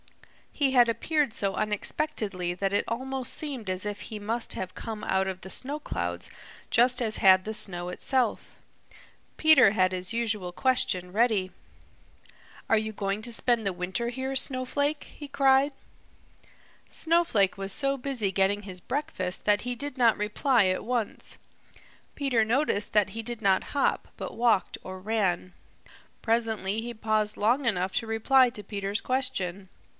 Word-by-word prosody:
He 280 -3 +1
had 245 -2 +6
appeared 295 +3 0
so 195 -3 0
unexpectedly 210 - -2
that 195 +2 -1
it 205 - +1
almost 260 +2 -3
seemed 265 -10 -4
as 185 0 -2
if 205 -1 -4
he 210 +3 -7
must 225 +3 -2
have 190 - -6
come 220 -2 -6
out 190 0 +1
of 185 -1 -5
the 190 - -9
snow 280 +9 -2
clouds 85 - -4 0.4
just 250 +1 +3
as 220 -2 0
had 185 -1 +5
the 220 - -3
snow 175 -4 +1
itself. 245 +5 -1 0.8
Peter 310 -10 +7
had 185 -3 +2
his 185 0 0
usual 220 -6 -1
question 185 -6 0
ready. 210 -3 +1 1.2
"Are 225 - +5
you 220 0 -2
going 200 0 -2
to 240 0 -6
spend 235 -1 +1
the 195 - +1
winter 185 +6 -2
here, 265 +2 -4
Snowflake?" 280 +3 +1
he 295 - -10
cried. 275 0 +3 1.2
Snowflake 320 - +2
was 195 0 -4
so 275 -1 +2
busy 250 -7 -2
getting 195 +2 +1
his 185 -2 -6
breakfast 265 -11 -4
that 205 0 +3
he 245 0 -3
did 285 +2 -5
not 235 -3 +4
reply 215 +2 +2
at 185 0 0
once. 240 -3 -3 0.8
Peter 265 -6 +2
noticed 230 -2 0
that 210 -2 +3
he 225 +3 -5
did 235 0 -4
not 195 -2 +2
hop, 280 - +1
but - - -6
walked 230 -5 +2
or 185 0 -7
ran. 185 -3 -1 0.7
Presently 225 -3 0
he 240 +1 -5
paused 215 -1 0
long 245 +6 +2
enough 185 -4 0
to 230 - -1
reply 250 +4 +4
to 210 -3 -8
Peter's 200 +1 -3
question. 200 -8 -2
220 Hz, 155 wpm, -27 LUFS, 195-255 Hz, 1.2 s, Peter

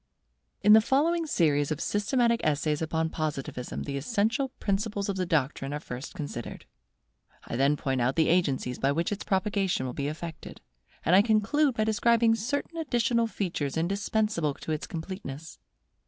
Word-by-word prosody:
In 210 - +8
the 220 - +8
following 320 +8 +1
series 145 - +2
of 155 -2 -2
systematic 235 +4 +1
essays 150 0 0
upon 160 0 -1
Positivism 140 -5 -4
the 140 -1 -4
essential 230 - 0
principles 200 0 -1
of 195 - -1
the 185 -2 -1
doctrine 140 -3 0
are 150 - -2
first 130 0 -7
considered; 145 -8 -6 0.8
I - - -5
then 140 +4 +3
point 135 -3 -1
out 125 +3 +1
the 160 -1 +3
agencies 140 -8 +1
by 135 - +2
which 165 +5 -1
its 205 - -3
propagation 195 -6 0
will 125 - -4
be 140 +2 -2
effected; 155 +1 -7 0.5
and 175 - +5
I 195 - +8
conclude 235 +6 +2
by 215 - +1
describing 225 +1 +3
certain 285 +9 -2
additional 240 -6 +1
features 165 -10 -3
indispensable 195 -2 0
to - - -6
its 155 0 -3
completeness. 160 -3 -7
180 Hz, 160 wpm, -28 LUFS, 145-220 Hz, 0.8 s, In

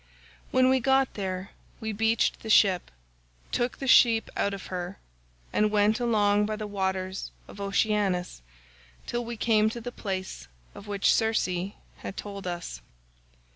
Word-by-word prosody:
When 255 0 +4
we 260 0 +4
got 265 +1 +2
there 190 -1 -4 0.3
we 220 0 -3
beached 225 +2 +1
the 220 - -8
ship, 190 -4 +4 0.6
took 240 0 -1
the 275 - -5
sheep 230 -3 +5
out 200 - +1
of 195 -2 -6
her, 180 +1 -4 0.6
and 210 0 +3
went 210 +1 +3
along 210 -3 +2
by 215 - -2
the 215 0 -5
waters 190 -2 -2 0.2
of 200 - -10
Oceanus 200 - 0 0.6
till 240 0 -2
we 235 0 -6
came 220 -1 +3
to 235 - -6
the 245 +1 -6
place 190 - -5 0.3
of 205 - -11
which 200 -1 +2
Circe 195 -5 +1 0.3
had - - -7
told 200 -2 -6
us. 175 - -5
210 Hz, 150 wpm, -27 LUFS, 190-225 Hz, 0.6 s, sheep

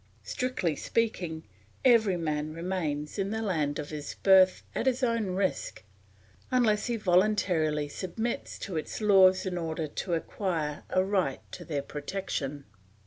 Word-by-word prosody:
Strictly 250 -11 -1
speaking, 175 -6 -1 0.4
every 220 -7 +5
man 155 -2 -2
remains 165 -2 -3
in 195 0 0
the 220 +1 -2
land 155 -8 0
of 150 0 -5
his 150 -2 -6
birth 190 -1 +6
at - - -1
his 255 0 +1
own 230 -6 0
risk 190 - -2 0.7
unless 230 -5 +2
he 240 - 0
voluntarily 180 -7 +2
submits 200 +10 -4
to 185 -5 -5
its 155 - -4
laws 190 -3 +5
in 180 -2 -2
order 160 -1 -2
to 170 +4 -2
acquire 160 -4 -3
a 185 - +2
right 190 -8 0
to - - -8
their 145 -4 -3
protection. 145 -2 -4
185 Hz, 140 wpm, -29 LUFS, 155-205 Hz, 0.7 s, birth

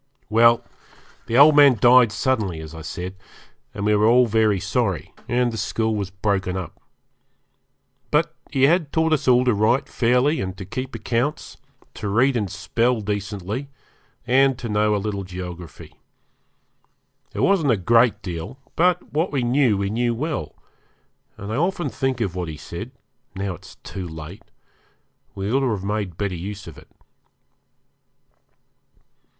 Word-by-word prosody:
Well, 115 +1 +5 0.6
the 115 - +1
old 145 +2 +8
man 140 -4 +7
died 120 0 +6
suddenly, 105 -10 -1
as 80 0 -9
I 80 - -8
said, 90 +4 -6 0.6
and 100 - -5
we 105 - +3
were 105 +1 +3
all 125 +2 +5
very 110 -3 +2
sorry, 95 -1 -2
and 120 -1 +1
the 115 - -4
school 110 +2 -1
was 100 -3 -3
broken 95 -1 -1
up. 90 -4 -7 1.3
But - - +1 0.2
he 135 - 0
had 160 +1 +3
taught 160 0 +2
us 150 - -1
all 125 0 +5
to 125 - +3
write 110 +6 +2
fairly 125 +6 +2
and 95 -1 -5
to 95 - -7
keep 130 +6 -5
accounts, 120 +6 -2 0.4
to 105 - -5
read 130 +6 +3
and 105 -5 -1
spell 115 +5 0
decently, 105 +5 -4 0.6
and 135 +1 +3
to 120 - -6
know 105 0 +1
a - - +1
little 100 -1 -3
geography. 90 -2 -9 1.4
It - - -2
wasn't 190 -7 +3
a 115 - +3
great 115 +4 +3
deal, 90 +7 -6 0.2
but 180 +1 +1
what 160 +5 0
we 135 -4 0
knew 120 -3 +2
we 100 0 -2
knew 120 +1 0
well, 150 +5 -4 0.8
and 100 +2 -6
I - - -1
often 175 -1 0
think 130 -2 -2
of 100 -6 -1
what 90 -2 -4
he 80 -1 -7
said, 85 +8 -7 0.5
now 95 0 -3
it's 85 - -13
too 95 -2 -6
late, 80 +5 -9 0.9
we 100 +1 -3
ought 135 - +4
to 135 -2 +1
have 105 -4 -2
made 100 -4 -3
better 100 -2 -2
use 95 +4 -6
of 80 -4 -11
it. - - -18
110 Hz, 160 wpm, -22 LUFS, 95-125 Hz, 1.4 s, old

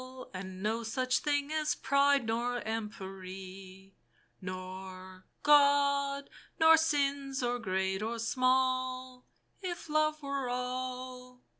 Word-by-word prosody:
And 185 0 -7
no 225 +2 0
such 255 +3 0
thing 290 0 0
as 310 -1 +1
Pride 280 -1 +3
nor 240 +2 -1
Empery, 190 -3 -7 0.5
Nor, 185 0 -8 0.2
God, 280 -1 +4 0.3
nor 320 0 +8
sins 280 -4 0
or 245 0 0
great 190 -2 -1
or 230 +2 -2
small, 255 +1 0 0.3
If 350 -4 -5
Love 310 0 +1
were 275 -2 -2
all 250 0 -4
250 Hz, 105 wpm, -32 LUFS, 195-280 Hz, 0.5 s, nor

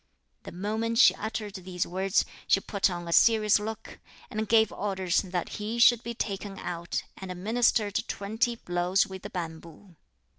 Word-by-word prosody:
The - - -9
moment 220 +5 -2
she 185 -6 +7
uttered 215 0 -5
these 185 -2 -3
words, 190 +2 +1 0.2
she - - +4
put 200 0 0
on 175 -1 -5
a 170 - -1
serious 215 -1 +5
look, 220 +1 -7 0.3
and 215 0 -3
gave 220 -2 +4
orders 190 -3 0
that 180 -3 -3
he 215 +3 -3
should 235 0 +6
be 235 0 -6
taken 200 -2 -4
out 170 0 -4
and 190 -1 -7
administered 210 +2 +1
twenty 225 +4 -1
blows 175 -1 +1
with 190 -2 -9
the - - -7
bamboo. 170 +1 -8
200 Hz, 160 wpm, -28 LUFS, 180-220 Hz, 0.3 s, she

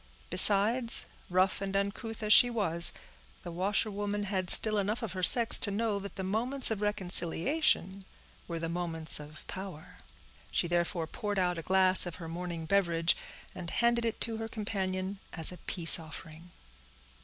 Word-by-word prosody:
Besides, 210 +6 +4 0.2
rough 185 +2 0
and 195 0 -5
uncouth 210 +3 -4
as 215 0 +5
she 245 - +7
was, 170 -8 +2 0.5
the 175 - -8
washerwoman 205 +3 -2
had 190 -3 -4
still 215 -1 +3
enough 210 +4 -3
of 210 -6 -5
her 185 - -6
sex 230 +5 +8
to - - +3
know 205 0 -2
that 200 0 -10
the 190 - -6
moments 235 +7 0
of 215 -2 -4
reconciliation 195 - 0 0.4
were 170 - -6
the 165 0 -5
moments 165 -2 -2
of 150 +1 -11
power. 185 -4 -10 0.5
She 175 - -1
therefore 175 0 -2
poured 205 +5 -6
out 180 -2 -1
a - - -6
glass 185 +2 +3
of 175 - -7
her 170 -2 -10
morning 170 0 -7
beverage, 170 -2 +1 0.4
and 175 -2 -7
handed 235 +4 0
it 230 -1 -3
to 225 -1 +2
her 225 0 -6
companion 195 -3 -5
as 165 -1 -3
a 180 - -10
peace 170 -2 +1
offering. 160 +1 -11
190 Hz, 165 wpm, -29 LUFS, 175-210 Hz, 0.5 s, sex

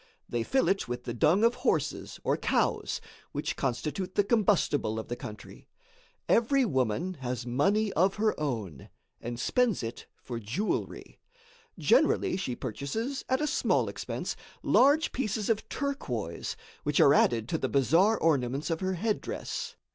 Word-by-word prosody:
They 120 - -1
fill 265 - +1
it 195 -9 +1
with 120 0 -4
the 120 - -4
dung 155 - +3
of 235 +1 +5
horses 200 - -1
or - - +2
cows, - - 0 0.3
which - - -2
constitute 150 +8 -2
the 205 - +4
combustible 195 - +2
of 110 - -5
the 120 - -2
country. 110 -3 -10 0.6
Every 260 +3 +3
woman 135 - 0
has 125 -1 -3
money 195 - +1
of 190 +3 +3
her 215 0 +2
own, 110 - -4 0.3
and 120 0 -5
spends 245 - +1
it 115 +1 -6 0.2
for 120 -2 -5
jewelry. 120 - -3 0.6
Generally - - +3
she 130 -10 -3
purchases, 225 - -4
at 260 +1 +2
a - - +2
small - - +1
expense, - - -4 0.3
large 295 +4 +4
pieces 215 -4 -1
of 220 -1 -2
turquoise, 125 - -3 0.2
which - - 0
are - - +7
added 115 -2 +3
to 160 - 0
the - - -1
bizarre 165 - +4
ornaments 140 -1 +1
of 165 - -1
her 190 0 -1
headdress. 230 - -3
165 Hz, 150 wpm, -29 LUFS, -, 0.6 s, are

